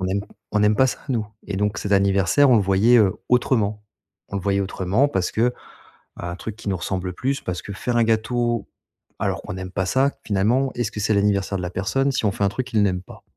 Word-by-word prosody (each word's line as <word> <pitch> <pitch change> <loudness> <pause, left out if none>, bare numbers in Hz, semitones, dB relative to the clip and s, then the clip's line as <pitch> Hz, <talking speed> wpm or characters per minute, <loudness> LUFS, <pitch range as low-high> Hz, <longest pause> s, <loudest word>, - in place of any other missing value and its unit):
On 95 - -1
aime 100 +2 0 0.3
on 105 - +2
n'aime 105 +1 +4
pas 130 - +5
ça - - -3
nous, 115 -5 -1 0.2
et 100 - -3
donc 105 +2 0
cet 100 - -2
anniversaire, 100 +8 +4
on 120 - +6
le 105 - +3
voyait, 100 +5 +4
heu, 100 -4 +4
autrement. 110 -4 +1 0.5
On 100 - -3
le 95 - -3
voyait 100 0 +1
autrement 95 +6 +1
parce 95 -9 -1
que 120 +3 +1 0.7
un 85 0 -5
truc 110 +2 -6
qui 105 - -6
nous 95 - 0
ressemble 90 +1 -3
plus 135 +8 -2
parce 90 -1 -4
que 100 - -7
faire 120 +5 -2
un 120 - +4
gâteau 115 +1 0 0.5
alors - - -1
qu'on - - -7
n'aime 95 0 -6
pas 95 +1 -1
ça, 135 +8 +2
finalement, 115 +7 +1
est-ce 120 -4 -2
que 105 - -6
c'est 105 - +2
l'anniversaire 100 -1 +1
de 90 - -4
la 90 - -2
personne 135 +10 0
si 130 - -1
on 105 - +3
fait 100 - -3
un 100 - +3
truc 130 +5 -4
qu'il 110 -5 +1
n'aime 90 -3 0
pas? 95 - -14
105 Hz, 240 wpm, -22 LUFS, 95-120 Hz, 0.7 s, on